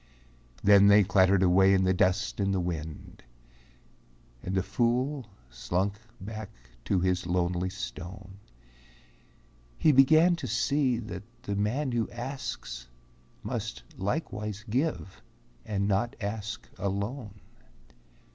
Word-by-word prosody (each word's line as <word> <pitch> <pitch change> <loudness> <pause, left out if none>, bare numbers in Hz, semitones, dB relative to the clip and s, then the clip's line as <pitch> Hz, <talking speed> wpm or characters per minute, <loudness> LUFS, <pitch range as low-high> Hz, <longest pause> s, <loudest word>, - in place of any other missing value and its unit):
Then 100 0 +7
they 100 0 +7
clattered 95 +1 +4
away 95 +2 +5
in 95 - +2
the 95 0 +3
dust 95 +3 +1
and 100 -1 +1
the - - +1
wind, 80 -3 -5 1.2
And 95 - -3
the 95 - +2
fool 125 +4 0 0.2
slunk 90 +11 -1 0.3
back 110 +1 -7 0.4
to 95 +3 +1
his 90 -1 0
lonely 90 +1 0
stone; 95 +3 -8 1.4
He 155 - +4
began 155 +6 +6
to 135 - -5
see 125 +3 +1
that 110 -2 -6 0.2
the 100 - -3
man 125 +8 0
who 120 -2 -1
asks 120 - -6 0.6
Must - - -4
likewise 105 - -3
give 125 - -2 0.5
and 100 -2 0
not 105 +4 0
ask 110 +2 -5
alone. 100 +3 -3
100 Hz, 115 wpm, -28 LUFS, 95-120 Hz, 1.4 s, Then